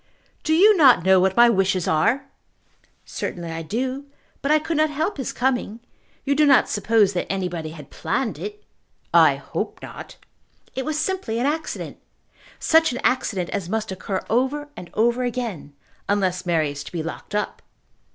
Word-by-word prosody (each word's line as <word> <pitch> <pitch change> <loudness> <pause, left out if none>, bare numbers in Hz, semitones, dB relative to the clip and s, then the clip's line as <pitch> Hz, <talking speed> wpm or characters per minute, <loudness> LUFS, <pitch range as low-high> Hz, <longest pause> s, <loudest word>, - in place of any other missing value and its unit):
"Do 315 - +1
you 415 +5 +6
not 265 - +6
know 190 0 +5
what 190 +1 +1
my 240 0 +8
wishes 190 -4 +1
are?" 205 - +2 0.8
"Certainly 170 -2 -5
I 165 0 -4
do; 255 - -3 0.4
but 275 - -2
I 305 - +6
could 320 +1 -2
not 310 0 +3
help 310 +6 -2
his 265 - -3
coming. 245 -4 -1 0.5
You 280 - +2
do 300 +1 +4
not 270 -5 +5
suppose 205 -1 +2
that 180 - -2
anybody 180 -4 -3
had 155 -3 -11
planned 250 -5 -2
it?" 420 0 -7 0.5
"I - - +6
hope - - -5
not." - - -9 0.6
"It 265 - -3
was 310 +1 -2
simply 340 -10 -2
an 240 - 0
accident. 310 +2 -3 0.6
Such 320 -2 +3
an 245 - -4
accident 200 -8 0
as 185 -4 -3
must 220 0 -2
occur 190 0 -3
over 270 +5 0
and 175 - -9
over 235 +3 +2
again, 230 - -4 0.3
unless 185 -3 0
Mary 160 -4 +1
is 145 0 -7
to - - -9
be 165 -3 -3
locked 165 +5 -7
up." 210 - -2
230 Hz, 170 wpm, -23 LUFS, 185-280 Hz, 0.8 s, my